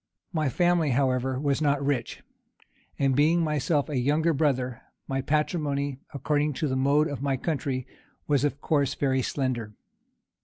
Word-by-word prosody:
My 155 -4 +1
family, 175 0 +2
however, 130 0 +1
was 140 +1 0
not 140 -2 +1
rich; 135 -5 -2 0.7
and 135 -2 +2
being 160 +4 +3
myself 150 -1 0
a 150 -4 -2
younger 155 +6 +2
brother, 130 -5 0 0.3
my 135 0 -1
patrimony, 145 -2 -1
according 150 +1 0
to 150 - -2
the 130 - -1
mode 140 +3 +3
of 145 -5 -5
my 140 -1 0
country, 135 -4 -2 0.4
was 145 -2 +2
of 145 -1 0
course 145 -4 +1
very 130 -2 +1
slender. 120 -6 -2
140 Hz, 150 wpm, -27 LUFS, 130-150 Hz, 0.7 s, being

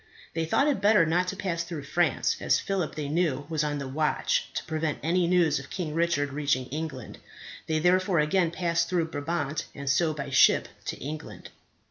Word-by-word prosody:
They 165 0 -1
thought 275 - +2
it 280 -9 +1
better 205 -4 +5
not 175 +3 +1
to 195 - -3
pass 180 -4 -2
through 170 -4 -6
France, 170 +3 +1
as - - +2
Philip, 190 -5 -2
they 150 -2 -3
knew, 150 -3 0
was 155 -2 0
on 145 -1 -1
the 140 -1 -4
watch 150 +3 0
to - - -2
prevent 155 -1 -2
any 170 +2 +2
news 175 -5 +3
of 135 - -11
King 165 -5 -4
Richard 155 -4 0
reaching 140 -3 0
England. 145 -5 -6 0.5
They 160 - +1
therefore 180 +2 +3
again 165 +3 +2
passed 170 -1 0
through 170 -3 0
Brabant, 155 0 -2
and 140 -1 -7
so 155 +4 +3
by 140 -2 -5
ship 135 - +5 0.2
to - - -4
England. 150 +3 -7
160 Hz, 190 wpm, -27 LUFS, 145-175 Hz, 0.5 s, better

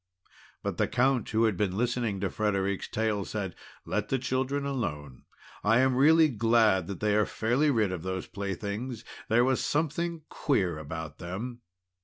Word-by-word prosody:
But - - -3
the - - +2
Count, 130 0 +1
who 110 0 +2
had 110 -3 +3
been 95 0 -1
listening 120 -3 0
to 100 - -1
Frederic's 100 -2 -1
tale, 110 -2 -1
said: 95 -3 -4 0.3
"Let 105 0 -2
the 135 - +2
children 130 +2 -1
alone. 75 - -4 0.4
I 115 +3 +4
am 130 -1 +3
really 160 +4 +6
glad 115 - +3
that 100 -3 -6
they 105 -1 +2
are 105 0 +3
fairly 125 +7 +1
rid 110 -8 +2
of 90 -3 -4
those 95 +1 -3
playthings. 100 +5 -4 0.2
There 120 +2 +4
was 130 -1 +1
something 165 +2 -1
queer 95 - 0
about 80 +1 -6
them." 110 +8 -5
110 Hz, 165 wpm, -29 LUFS, 100-130 Hz, 0.4 s, really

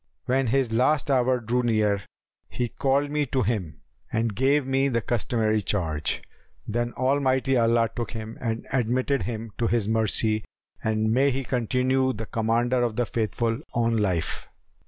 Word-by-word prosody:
When 130 +1 +1
his 130 0 +1
last 140 +5 +2
hour 130 -1 +3
drew 120 +2 0
near, 105 -4 +1 0.5
he 120 -1 -2
called 140 +3 0
me 150 -1 0
to 130 +1 0
him 100 -7 -2 0.3
and 115 -2 0
gave 135 +3 +2
me 135 +1 +2
the 120 -4 +1
customary 110 -1 0
charge; 80 -7 -1 0.4
then 120 +2 -1
Almighty 130 0 +1
Allah 115 -1 +3
took 120 - -3
him 110 0 -6
and 115 -2 -2
admitted 130 +2 +1
him 115 -1 -4
to 115 - +2
His 115 -3 +1
mercy 110 0 +1 0.4
and 110 0 +1
may 135 +3 +4
He 135 0 -2
continue 130 +2 +1
the 110 +1 -5
Commander 115 +3 +1
of 120 -3 0
the 120 - +1
Faithful 115 +1 -1 0.2
on 115 -1 +2
life! 90 -7 -1
120 Hz, 155 wpm, -25 LUFS, 110-130 Hz, 0.5 s, may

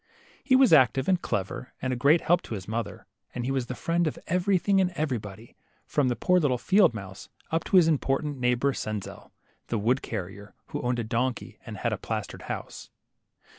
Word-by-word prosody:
He 260 - +4
was 260 -7 +6
active 130 -2 +5
and 185 -2 +2
clever, 100 +6 -3
and 130 -1 -2
a - - -1
great 145 +7 +4
help 175 +1 +3
to 115 - -6
his 95 -2 -8
mother, 110 0 -4 0.3
and 120 -1 -3
he 135 - -1
was 130 -3 -1
the 130 - -5
friend 170 +3 0
of 155 - -3
everything 190 +2 +2
and 185 - +2
everybody, 115 - -4 0.3
from 145 -3 +1
the 125 - +1
poor 180 +6 +3
little 140 -6 +1
field 185 - +4
mouse 95 -2 -9 0.2
up 165 +1 0
to 190 - +3
his 170 -3 +6
important 145 -2 0
neighbor, 125 +2 +2
Senzel, 110 -4 -6 0.4
the 115 - -1
wood 120 +6 +1
carrier, 100 -1 -7
who - - -4
owned 125 0 0
a 120 - -1
donkey 120 +3 -2
and - - -6
had - - -1
a - - -4
plastered - - -5
house. - - -6
130 Hz, 200 wpm, -27 LUFS, 115-165 Hz, 0.4 s, was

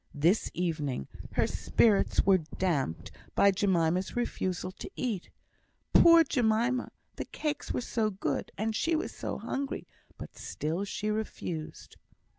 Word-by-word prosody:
This 170 +9 +3
evening 155 - -2 0.3
her - - +3
spirits 210 -4 +2
were 195 -1 +6
damped 155 - -2 0.2
by 200 - +6
Jemima's 185 -2 +1
refusal 185 -6 -2
to - - -6
eat. 220 -8 -3 0.6
Poor 335 -1 +8
Jemima! 245 -2 +1 0.3
the - - -3
cakes 295 -2 -3
were - - -1
so 225 -2 0
good, 195 -1 -3
and 220 +1 -1
she 330 +8 +1
was 315 - -2
so - - -4
hungry; 275 +1 -3 0.3
but - - -9
still 165 +6 -3
she 210 +1 -2
refused. 180 -7 -5
200 Hz, 130 wpm, -30 LUFS, 175-235 Hz, 0.6 s, Poor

